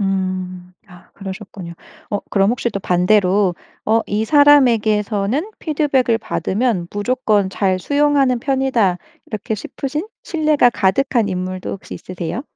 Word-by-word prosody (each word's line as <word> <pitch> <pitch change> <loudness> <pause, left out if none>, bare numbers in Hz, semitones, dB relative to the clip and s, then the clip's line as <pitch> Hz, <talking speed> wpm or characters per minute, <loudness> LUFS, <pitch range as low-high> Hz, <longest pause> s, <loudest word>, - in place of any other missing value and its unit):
음. 185 -2 -3 0.2
아 180 -1 -17
그러셨군요. 190 -3 -8 0.4
어 205 - -1
그럼 195 0 +3
혹시 240 0 -1
또 200 - -3
반대로 185 +1 +2 0.3
어 225 +1 +3
'이 215 +2 -1
사람에게서는 235 - +3
피드백을 280 -7 +1
받으면 210 -4 -1
무조건 205 -2 0
잘 190 -1 0
수용하는 285 +1 +2
편이다.' 255 -9 +1 0.3
이렇게 215 0 -4
싶으신 290 - -5 0.2
신뢰가 305 -6 +2
가득한 225 +2 +1
인물도 185 0 -4
혹시 195 - -8
있으세요? 185 +7 -5
210 Hz, 300 characters per minute, -19 LUFS, 190-260 Hz, 0.4 s, 그럼